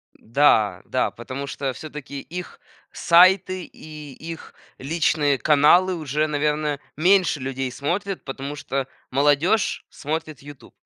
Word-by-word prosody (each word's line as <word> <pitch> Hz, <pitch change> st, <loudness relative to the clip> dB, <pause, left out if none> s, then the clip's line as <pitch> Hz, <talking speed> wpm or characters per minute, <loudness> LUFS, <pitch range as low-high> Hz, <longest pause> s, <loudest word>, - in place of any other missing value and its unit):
Н-да, 110 Hz, -7 st, +2 dB
да, -, -, 0 dB
потому 130 Hz, +4 st, -7 dB
что 140 Hz, -1 st, -3 dB
всё-таки 145 Hz, -1 st, -8 dB
их 180 Hz, +4 st, -8 dB, 0.3 s
сайты 185 Hz, +1 st, +4 dB
и 150 Hz, -2 st, -11 dB
их 165 Hz, +3 st, -9 dB, 0.2 s
личные 145 Hz, -1 st, +1 dB
каналы 155 Hz, +7 st, +4 dB
уже, 155 Hz, -1 st, -1 dB
наверное, 150 Hz, -1 st, -1 dB, 0.2 s
меньше 180 Hz, -1 st, +3 dB
людей 130 Hz, 0 st, -3 dB
смотрят, 185 Hz, +9 st, -3 dB
потому 135 Hz, +1 st, -6 dB
что 135 Hz, -2 st, -3 dB, 0.2 s
молодёжь 145 Hz, +10 st, +2 dB
смотрит 155 Hz, -1 st, -5 dB
"Ютуб". 145 Hz, -1 st, -13 dB
150 Hz, 115 wpm, -23 LUFS, 140-165 Hz, 0.3 s, сайты